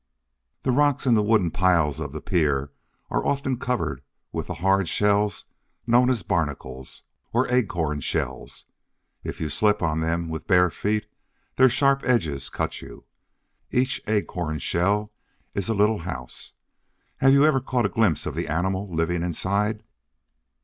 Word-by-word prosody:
The 130 - +1
rocks, 145 +1 +2
and 120 -3 +5
the 105 - +4
wooden 105 -5 +2
piles 85 -5 +2
of 75 -3 -4
the 75 +1 -6
pier, 70 -6 0 0.4
are - - 0
often 135 -3 -1
covered 125 -1 -2 0.3
with - - -4
the - - -4
hard 95 -1 +2
shells 105 -1 +1 0.4
known 120 +2 +4
as 125 -5 0
Barnacles, 70 -5 -3 0.3
or 120 +3 +2
Acorn 85 -11 0
Shells. - - -3 0.6
If - - -6
you 80 - -2
slip 105 +6 +1
on 80 -1 +1
them 85 +1 -1
with 80 -1 -6
bare 90 -3 +4
feet 105 +6 -1 0.5
their 130 0 +6
sharp 140 +2 +3
edges 80 - 0
cut - - -3
you. - - -12 0.6
Each 130 +2 0
Acorn 90 -7 -1
Shell 100 +7 0 0.4
is 100 0 -2
a 110 - +1
little 105 +1 +3
house. 80 -8 -7 0.6
Have 135 0 +5
you 140 +1 +6
ever 155 -3 +4
caught 125 -3 0
a - - +4
glimpse 100 -9 +1
of - - -3
the - - -3
animal 95 +5 -1
living 85 +1 0
inside? 100 +5 -1
100 Hz, 155 wpm, -24 LUFS, 80-115 Hz, 0.6 s, their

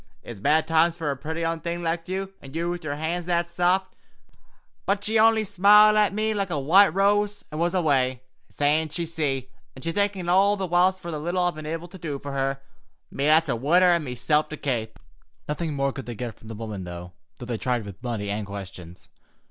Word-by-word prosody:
It's 115 -4 -9
bad 150 +9 +2
times 165 +1 +3
fer 155 -4 -2
a - - -2
pretty 160 +5 -4
un 165 0 -2
like 170 0 -3
you, 190 +1 -3
an' 135 +2 -12
you 170 +1 -1
with 175 -1 -5
yer 145 -2 -3
hands 165 +3 -3
that 170 -1 +1
saft;' 180 +2 0 0.9
but 200 +1 0
she 220 +1 +2
only 225 0 +5
smiled 210 +2 +6
at 210 -2 +3
me 215 +2 0
like 200 -2 -2
a 165 - -2
white 185 +9 +6
rose, 205 +3 +1
an' 155 - -5
was 175 +2 0
away, 130 -7 +1 0.3
sayin' 150 +2 +1
she'd 170 +3 -3
see, 140 -6 -2 0.2
and 130 - -11
she 165 - -1
thankin' 200 -1 -1
me 175 - 0
all 200 +3 +4
the 195 - -2
whilst 180 +2 +2
fer 170 - -6
the 155 - -4
little 175 +4 -1
I'd 175 0 +1
been 155 -1 -8
able 165 +2 -4
to 190 +2 -13
do 155 -4 -4
fer 140 +1 -7
her—me 135 0 -5
that's 155 0 +4
a 125 - +1
widder 175 +9 +4
an' 170 -2 +2
meself 140 +4 0
to 155 - -6
kape." 115 -6 -3 0.5
Nothing 150 0 -3
more 140 -1 0
could 135 -4 -8
they 120 - -5
get 120 0 -5
from 110 - -17
the 110 - -7
good - - -11
woman, 105 -4 -5
though 90 0 -8 0.2
they 120 -2 -5
tried 125 -2 0
both 100 -1 -8
with 95 - -28
money 110 -5 -3
and 105 0 -3
questions. 95 -3 -9
160 Hz, 225 wpm, -25 LUFS, 135-180 Hz, 0.9 s, smiled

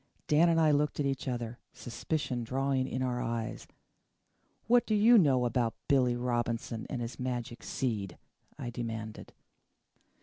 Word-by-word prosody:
Dan 160 +3 +4
and 165 -1 +3
I 155 -2 +5
looked 145 0 +1
at 145 - +1
each 135 -1 -2
other, 120 -1 -3
suspicion 125 +1 -3
dawning 130 +2 0
in 130 0 -2
our 125 -1 -1
eyes. 115 -2 -3 1.0
"What 240 +1 +4
do 215 - +2
you 225 +4 +6
know 135 -7 +3
about 115 -1 0
Billy 130 -4 +3
Robinson 120 -2 -2
and 125 - -3
his 115 +2 -6
magic 120 -2 -3
seed?" 105 -8 -3 0.4
I 120 - -5
demanded. 115 -2 -5
125 Hz, 145 wpm, -31 LUFS, 115-140 Hz, 1.0 s, you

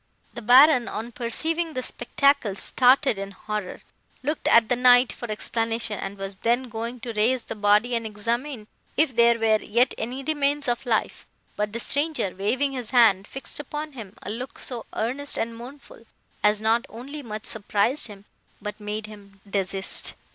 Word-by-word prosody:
"The - - -7
Baron, 250 +2 +6
on 230 +3 -5
perceiving 320 +8 -1
the 255 - -3
spectacle, 250 -3 +1
started 255 +1 +3
in 195 0 -4
horror, 210 -1 -5 0.4
looked 300 +3 -2
at 230 -1 +6
the 245 - +2
Knight 250 0 +6
for 240 - -8
explanation, 225 0 -2
and 200 +1 -5
was 195 0 -6
then 240 +4 0
going 230 +2 -5
to 235 0 -5
raise 230 +4 +1
the - - -6
body 210 +3 +3
and 230 -1 0
examine 230 +3 -3 0.3
if 295 -5 +2
there 235 0 +5
were 220 -1 +2
yet 240 +4 +2
any 255 +4 -4
remains 290 -1 0
of 240 +1 -1
life; 225 -2 -1 0.3
but 210 0 -2
the 230 - -4
stranger, 285 - 0
waving 240 +9 0
his 250 -4 -5
hand, 215 -6 +4
fixed 270 - -5
upon 300 +2 -5
him 220 -7 -10
a 200 - -5
look 245 +4 -6
so 240 -3 -6
earnest 265 +6 -1
and 230 0 -2
mournful, 245 0 -12 0.4
as 210 +1 +3
not 225 +2 +3
only 275 +7 -8
much 215 -4 -7
surprised 220 +6 0
him, 205 -2 -12 0.3
but 210 +1 -6
made 210 +1 -4
him 200 -2 -14
desist. 195 -1 -1
235 Hz, 170 wpm, -25 LUFS, 210-260 Hz, 0.4 s, Baron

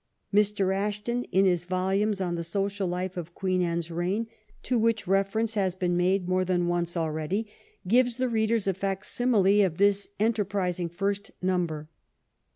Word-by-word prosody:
Mr. 200 -2 +2
Ashton, 210 +5 -2
in 195 +1 +2
his 175 -3 +2
volumes 190 +3 0
on 180 -2 -1
the 170 -1 -2
social 195 +3 -1
life 180 +1 -3
of 175 0 -6
Queen 185 -2 0
Anne's 170 -1 -1
reign, 180 +7 -1 0.4
to 250 -2 +1
which 225 -1 +1
reference 195 +4 +1
has 190 -4 0
been 180 -1 0
made 180 +1 +1
more 185 0 +2
than 180 -1 +1
once 175 0 -1
already, 160 +6 -1 0.4
gives 245 +3 +3
the 255 0 +1
readers 225 -2 +1
a 195 - +1
fac 195 +1 -3
simile 210 -5 +3
of 175 -4 -1
this 200 0 +2
enterprising 200 -5 0
first 200 +3 -2
number. 175 -5 -1
190 Hz, 160 wpm, -27 LUFS, 175-205 Hz, 0.4 s, gives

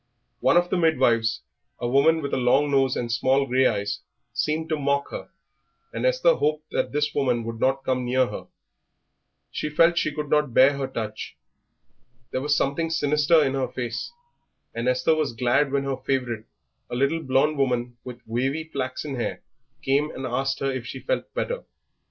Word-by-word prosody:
One 130 - +4
of 175 0 +2
the - - +2
midwives, 120 -9 +2 0.4
a 120 - -3
woman 150 +5 +3
with 140 - -4
a - - +2
long 135 +3 +3
nose 135 -2 +3
and 120 -1 -3
small 130 +4 +2
grey 130 0 +3
eyes, 100 -1 -2 0.3
seemed 155 +1 -1
to 155 -2 0
mock 140 0 0
her, - - -7 0.6
and - - 0
Esther - - +4
hoped 155 - -1
that - - -1
this 150 +1 0
woman 125 -4 +1
would 115 0 -6
not 135 +2 +1
come 130 -1 0
near 130 +1 +2
her. - - -7 1.0
She 150 - -3
felt 165 +3 +5
that 170 - -11
she 155 - 0
could 150 0 -4
not 150 -4 +1
bear 135 +2 +6
her 135 -1 -2
touch. 110 -4 -6 0.9
There 130 - -2
was 145 +1 +1
something 165 +4 0
sinister 150 +1 +3
in 135 -2 0
her 135 -1 0
face, 120 - -4 0.6
and 115 +1 -3
Esther 125 +5 +3
was 155 -6 -1
glad 125 +4 +2
when 140 0 +1
her 135 -1 -2
favourite, 125 -5 -2 0.4
a - - -4
little 140 +6 +1
blond 140 +1 +1
woman 125 -2 0
with 125 -1 -10
wavy 135 +7 -1
flaxen 140 -2 -4
hair, 120 - -3 0.4
came 140 +3 +2
and 130 - -6
asked 135 +2 -1
her 135 0 +1
if 130 -2 -4
she - - -6
felt - - -2
better. - - -2
135 Hz, 185 wpm, -25 LUFS, 125-150 Hz, 1.0 s, bear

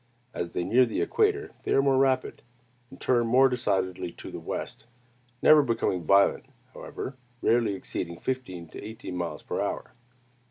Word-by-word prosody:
As 85 -1 -4
they 90 - -1
near 120 +8 +4
the 115 -3 -1
equator, 420 -1 +1
they - - -1
are - - +5
more 135 -1 +3
rapid, 135 -1 +1 0.5
and 135 - -14
turn 120 -2 +2
more 130 +3 +6
decidedly 95 -8 -1
to - - -9
the - - -6
west, 110 - -6 0.6
never 155 -1 +8
becoming 115 - -1
violent, 100 +4 +4 0.3
however; 130 - -7 0.3
rarely 115 -3 +3
exceeding 85 -2 -5
fifteen 95 -7 -4
to - - -9
eighteen 110 -4 -7
miles 85 -1 -4
per - - -3
hour. - - -3
115 Hz, 160 wpm, -27 LUFS, 95-130 Hz, 0.6 s, never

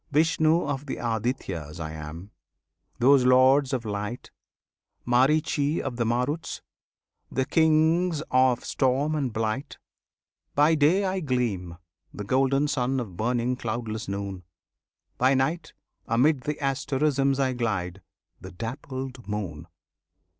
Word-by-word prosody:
Vishnu 160 +2 +3
of 145 0 -3
the - - -3
Adityas 110 - -3
I 80 -1 -4
am, 80 +5 -8 0.7
those 135 +1 +5
Lords 130 +2 +5
of 125 -4 -2
Light; 105 +3 -5 0.7
Maritchi 145 +4 +2
of 120 - -4
the 120 - 0
Maruts, 125 +7 -2 0.7
the 130 - 0
Kings 160 +2 +2
of 130 -1 +3
Storm 135 +3 +1
and 140 -5 -1
Blight; 110 +6 -3 0.8
By 150 +3 +5
day 160 +6 +3
I 190 0 -1
gleam, 115 - -2 0.3
the 105 - -7
golden 135 +6 +2
Sun 135 -2 0
of 105 -8 -6
burning 120 +4 0
cloudless 115 -2 -4
Noon; 100 -1 -4 0.8
By 130 +2 +4
Night, 145 +6 -1 0.3
amid 130 +4 +2
the 150 - -1
asterisms 135 0 0
I 130 -1 +1
glide, 100 -6 -2 0.4
the - - -9
dappled 125 - -6
Moon! 90 -7 -5
130 Hz, 120 wpm, -26 LUFS, 110-145 Hz, 0.8 s, those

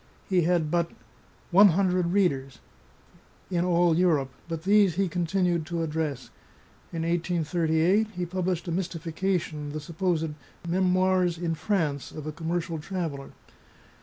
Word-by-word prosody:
He 185 -2 +3
had 165 -2 +1
but 170 -1 +1 0.3
" - - -31
one 200 +4 +8
hundred 180 -1 +2
readers" 140 -9 0 0.9
in 175 -1 +1
all 175 -2 +3
Europe, 160 -7 +2 0.2
but 165 -1 -5
these 200 -3 +4
he 195 +1 +1
continued 175 0 0
to 170 -1 -2
address. 155 -4 -3 0.6
In 165 -1 -3
18 170 0 0
j8 170 +6 +2
he 180 -1 -3
published 180 0 -2
a - - -2
mystification, 165 -3 -2
the 155 - -3
supposed 165 +1 -1 0.2
" - - -15
Memoirs 185 0 +2
in 165 -1 -1
France" 160 -6 -1
of 155 - -8
a 155 - -3
commercial 165 +1 -3
traveller. 160 -5 -5
170 Hz, 140 wpm, -27 LUFS, 160-185 Hz, 0.9 s, one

